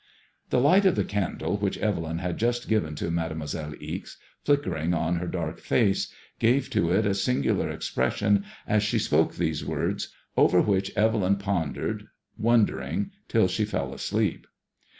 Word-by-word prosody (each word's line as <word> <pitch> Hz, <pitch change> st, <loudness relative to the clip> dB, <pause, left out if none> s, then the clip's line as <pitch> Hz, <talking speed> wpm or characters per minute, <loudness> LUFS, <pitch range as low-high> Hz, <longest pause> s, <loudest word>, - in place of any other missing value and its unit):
The -, -, +3 dB
light 185 Hz, +9 st, +5 dB
of 185 Hz, -, +3 dB
the -, -, +1 dB
candle 100 Hz, 0 st, -2 dB
which 100 Hz, -1 st, -1 dB
Evelyn 80 Hz, -6 st, -1 dB
had 90 Hz, 0 st, -3 dB
just 120 Hz, +1 st, 0 dB
given 90 Hz, -9 st, 0 dB
to 85 Hz, -, -3 dB
Made 80 Hz, -1 st, -1 dB
moiselle 75 Hz, -1 st, -5 dB
Ixe^ -, -, -6 dB, 0.3 s
flickering 90 Hz, -, +1 dB
on 85 Hz, +2 st, 0 dB
her 90 Hz, +1 st, -3 dB
dark 85 Hz, -3 st, -3 dB
face, 100 Hz, -5 st, +1 dB, 0.3 s
gave 125 Hz, +4 st, +2 dB
to 85 Hz, -, +1 dB
it 100 Hz, +4 st, +3 dB
a 100 Hz, -, +2 dB
singular 100 Hz, -, +1 dB
ex -, -, -4 dB
pression 100 Hz, +10 st, +2 dB, 0.2 s
as 105 Hz, 0 st, +2 dB
she 105 Hz, -, +1 dB
spoke -, -, +2 dB
these 80 Hz, -3 st, -1 dB
words, -, -, -2 dB, 0.2 s
over 90 Hz, -, +5 dB
which 95 Hz, 0 st, +1 dB
Evelyn 105 Hz, -3 st, +3 dB
pondered, 100 Hz, -7 st, -2 dB, 0.3 s
wondering, 115 Hz, -1 st, +1 dB, 0.2 s
till -, -, +3 dB
she -, -, 0 dB
fell -, -, -2 dB
asleep. -, -, -1 dB
100 Hz, 160 wpm, -26 LUFS, 85-110 Hz, 0.3 s, light